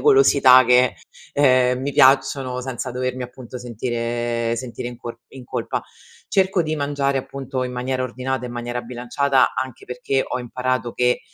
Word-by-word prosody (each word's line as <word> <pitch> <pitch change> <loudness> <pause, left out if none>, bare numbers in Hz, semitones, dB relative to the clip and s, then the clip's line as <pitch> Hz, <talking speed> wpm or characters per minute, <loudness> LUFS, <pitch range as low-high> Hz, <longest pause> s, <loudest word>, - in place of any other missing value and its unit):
golosità 270 - +6
che, 125 0 +4 0.4
ehm, 130 -3 +4
mi 140 +1 -2
piacciono 130 -1 +3
senza 130 0 -4
dovermi, 130 0 -3
appunto, 125 0 -9
sentire 120 0 -2
sentire 120 0 -5
in 120 - -9
cor 120 -1 -8
in 130 -2 -11
colpa. - - -3 0.5
Cerco 190 -2 +2
di 155 0 -2
mangiare, 140 -1 0
appunto, 135 0 -4
in 125 - -4
maniera 130 +1 -2
ordinata, 130 +1 -3
in 120 - -7
maniera 120 0 -4
bilanciata 125 +3 +1
anche 130 -2 -5
perché, 125 +2 -1
ho - - -3
imparato 125 0 -2
che, 125 0 +2
125 Hz, 155 wpm, -21 LUFS, 120-135 Hz, 0.5 s, golosità